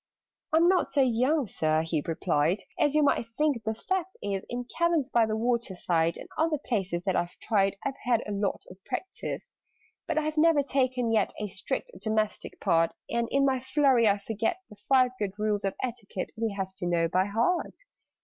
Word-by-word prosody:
"I'm 330 Hz, +2 st, +5 dB
not 370 Hz, 0 st, +3 dB
so 285 Hz, -, +3 dB
young, 260 Hz, +4 st, +2 dB
Sir," 155 Hz, -5 st, 0 dB
he 160 Hz, -2 st, -1 dB
replied, 165 Hz, +2 st, +1 dB, 0.2 s
"As 290 Hz, 0 st, +2 dB
you 305 Hz, -, +5 dB
might 280 Hz, -, +3 dB
think. 295 Hz, -7 st, +1 dB
The 220 Hz, 0 st, -2 dB
fact 375 Hz, +8 st, -3 dB
is, 195 Hz, -1 st, -2 dB
In 245 Hz, +1 st, -3 dB
caverns 335 Hz, -5 st, +1 dB
by 230 Hz, -2 st, +4 dB
the 215 Hz, 0 st, -1 dB
water 235 Hz, -3 st, 0 dB
side, 170 Hz, -2 st, +1 dB
And -, -, -9 dB
other 320 Hz, -1 st, +2 dB
places 195 Hz, -10 st, -2 dB
that 190 Hz, -1 st, 0 dB
I've 175 Hz, +1 st, -1 dB
tried, 195 Hz, -3 st, +1 dB
I've 275 Hz, -1 st, -2 dB
had 240 Hz, -2 st, +2 dB
a 210 Hz, -, -5 dB
lot 200 Hz, -1 st, -1 dB
of 185 Hz, +1 st, -15 dB
practice: 375 Hz, -, -5 dB, 0.6 s
"But -, -, -1 dB
I -, -, +4 dB
have 310 Hz, +1 st, -3 dB
never 315 Hz, -2 st, +5 dB
taken 255 Hz, -3 st, 0 dB
yet 220 Hz, -, +2 dB
A 210 Hz, -1 st, -3 dB
strict 195 Hz, -, -3 dB
domestic 215 Hz, -1 st, -1 dB
part, 165 Hz, 0 st, +2 dB, 0.2 s
And 235 Hz, 0 st, 0 dB
in 275 Hz, 0 st, +3 dB
my 265 Hz, -1 st, +2 dB
flurry 260 Hz, -3 st, +3 dB
I 200 Hz, -, +3 dB
forget 225 Hz, -, -2 dB
The -, -, -11 dB
Five 255 Hz, -2 st, +5 dB
Good 200 Hz, -3 st, -2 dB
Rules 210 Hz, -1 st, 0 dB
of 195 Hz, -, -1 dB
Etiquette 230 Hz, -7 st, -4 dB
We 220 Hz, -2 st, -2 dB
have 190 Hz, -1 st, -3 dB
to 175 Hz, -, -3 dB
know 170 Hz, -1 st, +2 dB
by 185 Hz, +3 st, +2 dB
heart." 230 Hz, -, 0 dB
225 Hz, 195 wpm, -28 LUFS, 195-275 Hz, 0.6 s, I'm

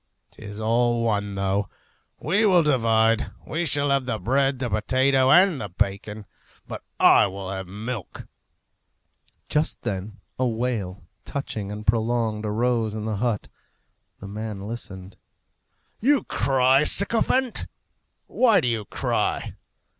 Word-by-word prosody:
'Tis 105 Hz, -1 st, -10 dB
all 120 Hz, +1 st, +1 dB
one, 105 Hz, -3 st, -1 dB
though! 100 Hz, +1 st, -1 dB, 0.5 s
We 195 Hz, +9 st, +1 dB
will 185 Hz, -5 st, +5 dB
divide. 115 Hz, -5 st, +2 dB, 0.2 s
He 170 Hz, +2 st, -2 dB
shall 145 Hz, -1 st, +2 dB
have 135 Hz, -2 st, +1 dB
the 115 Hz, -3 st, -1 dB
bread, 135 Hz, +6 st, +1 dB
the 125 Hz, -1 st, -2 dB
potato, 130 Hz, +5 st, +2 dB
and 180 Hz, -3 st, +5 dB
the 105 Hz, -, -5 dB
bacon; 100 Hz, +3 st, -3 dB, 0.4 s
but -, -, -7 dB, 0.2 s
I -, -, +6 dB
will 95 Hz, 0 st, -6 dB
have 95 Hz, -1 st, -5 dB
the -, -, -14 dB
milk." 110 Hz, 0 st, -6 dB, 1.2 s
Just 150 Hz, +1 st, -1 dB
then 100 Hz, +2 st, -4 dB, 0.2 s
a 130 Hz, -, +2 dB
wail, 110 Hz, -5 st, -3 dB, 0.2 s
touching 110 Hz, -8 st, -5 dB
and 105 Hz, +1 st, -7 dB
prolonged, 110 Hz, -1 st, 0 dB
arose 115 Hz, 0 st, 0 dB
in 110 Hz, -1 st, -4 dB
the 110 Hz, -2 st, -2 dB
hut. 115 Hz, -1 st, -1 dB, 0.7 s
The 100 Hz, -, -9 dB
man 105 Hz, -1 st, -6 dB
listened. 95 Hz, -4 st, -8 dB, 0.8 s
"You 275 Hz, +3 st, +3 dB
cry, 135 Hz, +1 st, +3 dB
sycophant! 230 Hz, +7 st, +1 dB, 0.6 s
Why 235 Hz, -5 st, +3 dB
do -, -, -1 dB
you 115 Hz, -3 st, -1 dB
cry?" -, -, -2 dB
115 Hz, 130 wpm, -24 LUFS, 105-135 Hz, 1.2 s, I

